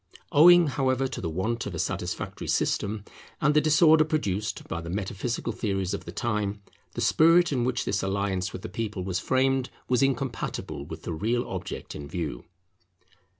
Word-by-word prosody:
Owing, 175 +3 +8
however, 135 -2 +1
to 130 - -6
the 85 - -2
want 110 +8 -2
of 95 - -5
a - - -4
satisfactory - - -3
system, 105 0 0 0.4
and 150 0 +3
the 150 - +5
disorder 155 +1 +6
produced 105 -10 -2
by 85 - -4
the 85 - -7
metaphysical 105 +5 -3
theories 95 -4 -2
of 100 - -5
the - - -7
time, 105 -3 -2 0.3
the - - -4
spirit 165 +1 +5
in 125 -4 +1
which 125 -1 -1
this 100 - 0
alliance 95 -1 -1
with 90 - -8
the - - -4
people 105 -1 -4
was 95 0 -2
framed 130 +2 +1 0.2
was 125 -1 +2
incompatible 135 -2 -2
with - - -8
the 85 - -4
real 115 +9 -1
object - - -6
in 70 -1 -7
view. 75 -5 -4
115 Hz, 175 wpm, -27 LUFS, 95-135 Hz, 0.4 s, Owing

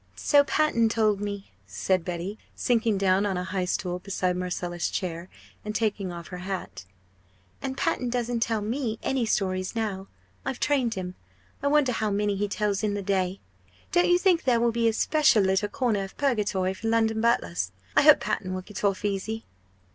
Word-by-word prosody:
"So 285 -1 +4
Panton 285 -5 +2
told 215 -3 +2
me," 200 -1 -5 0.2
said 170 - 0
Betty, 180 +4 -4 0.2
sinking 225 -3 +1
down 190 0 +3
on 195 -3 0
a 180 - -2
high 185 0 -2
stool 180 0 -2
beside 185 -1 -1
Marcella's 175 -1 -2
chair, 175 -1 -4 0.3
and 210 0 -5
taking 210 -4 -1
off 170 -1 -8
her 180 - -6
hat; 180 - -5 0.8
"and 265 0 -4
Panton 250 -2 0
doesn't 240 -1 -1
tell 225 -2 0
me 225 +1 -2
any 260 -4 0
stories 185 -2 -1
now 200 -4 -2 0.4
I've 265 -2 -3
trained 260 -6 +1
him. 180 -1 -4 0.5
I 285 - 0
wonder 290 -3 +3
how 220 -2 -1
many 205 0 0
he 205 +1 -1
tells 205 0 -1
in 210 -2 0
the 200 - -3
day? 190 -1 0 0.5
Don't 350 0 +3
you 355 - +6
think 360 -2 +3
there 245 -3 +3
will 235 0 +3
be 230 0 +1
a 225 - +2
special 280 -4 +4
little 190 +2 +1
corner 225 -6 0
of 195 - -9
purgatory 205 -8 +1
for 225 +4 -5
London 225 -1 +2
butlers? 95 - +1 0.2
I - - +7
hope 300 0 +7
Panton 185 -2 -2
will 185 - -5
get 210 +2 -8
off 200 0 +1
easy!" 205 +3 -2
205 Hz, 185 wpm, -26 LUFS, 185-235 Hz, 0.8 s, I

